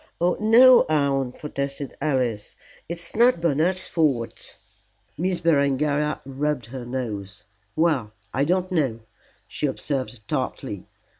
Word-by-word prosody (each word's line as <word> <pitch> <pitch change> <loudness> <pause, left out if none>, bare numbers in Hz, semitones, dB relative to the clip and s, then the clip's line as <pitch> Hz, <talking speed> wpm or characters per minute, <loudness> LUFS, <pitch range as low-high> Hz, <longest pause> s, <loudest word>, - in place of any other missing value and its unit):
"Oh 175 +1 +2
no, 240 +4 +7
aunt," 140 -4 0
protested 140 -2 -4
Alice; 125 -8 -1 0.3
"it - - -1
is 165 0 -5
not 235 -3 +4
Bernard's 170 +3 +1
fault." 140 -9 -1 0.6
Miss 180 +2 -1
Berengaria 150 -1 +1
rubbed 140 -1 -2
her 125 +1 -8
nose. 105 -6 -5 0.3
"Well, 150 -10 +1 0.2
I 135 - +1
don't 185 +4 0
know," 135 -10 0 0.5
she 125 +8 -2
observed 130 -5 -4
tartly. 130 -7 -4
140 Hz, 120 wpm, -24 LUFS, 130-165 Hz, 0.6 s, no